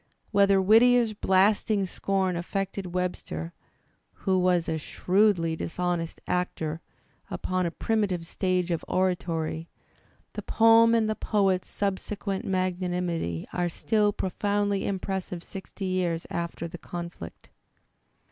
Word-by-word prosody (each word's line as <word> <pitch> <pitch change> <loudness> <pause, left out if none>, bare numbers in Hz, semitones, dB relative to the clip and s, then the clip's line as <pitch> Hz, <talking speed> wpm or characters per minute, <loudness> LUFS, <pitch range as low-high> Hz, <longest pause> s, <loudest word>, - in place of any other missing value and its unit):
Whether 200 -2 +5
Whit 210 +4 +6
tier's 245 -3 +4
blasting 200 +1 +2
scorn 190 0 -1
affected 190 +1 -3
Webster, 85 - -3 0.7
who 190 -1 +3
was 180 -2 +2
a 160 - -1
shrewdly? 180 0 +2
dishonest 175 0 -2
actor 165 -3 -2 0.5
upon 185 -1 -1
a - - 0
primitive 190 -2 -1
stage 180 0 0
of 165 - -1
oratoiy, 165 -3 -1 0.7
the - - -4
poem 230 +1 +5
1 - - +5
and 220 -1 +2
the - - -1
poet's 195 -4 +1
subsequent 200 +1 -2
magnanimity 180 - -1
are 175 -1 0
still 210 +4 +1
profoundly 205 +1 -1
impressive 190 -2 -3
sixty 195 +1 -7
years 180 -3 -1
after 170 0 -3
the 170 +1 -9
conflict. 170 - -8
185 Hz, 120 wpm, -27 LUFS, 175-200 Hz, 0.7 s, Whit